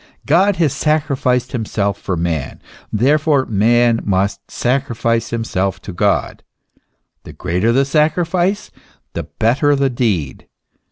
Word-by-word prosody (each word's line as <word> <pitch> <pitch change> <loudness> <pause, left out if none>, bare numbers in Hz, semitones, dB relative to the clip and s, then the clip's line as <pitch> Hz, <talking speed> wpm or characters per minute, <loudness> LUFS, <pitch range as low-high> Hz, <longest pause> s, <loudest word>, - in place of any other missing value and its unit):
God 185 +7 +3
has 160 -6 +1
sacrificed 135 -5 0
himself 105 -4 -1
for 95 -3 -4
man; 80 -4 -3 0.3
therefore 140 +4 +2
man 115 +2 +3
must 100 0 -1
sacrifice 120 -3 -1
himself 100 -5 -2
to 100 - -7
God. 100 +2 0 0.8
The - - -11
greater 90 +6 0
the 135 +3 +3
sacrifice 170 +6 0 0.4
the - - -3
better 140 +6 +1
the 135 -1 +1
deed. 105 - -2
120 Hz, 115 wpm, -17 LUFS, 100-145 Hz, 0.8 s, God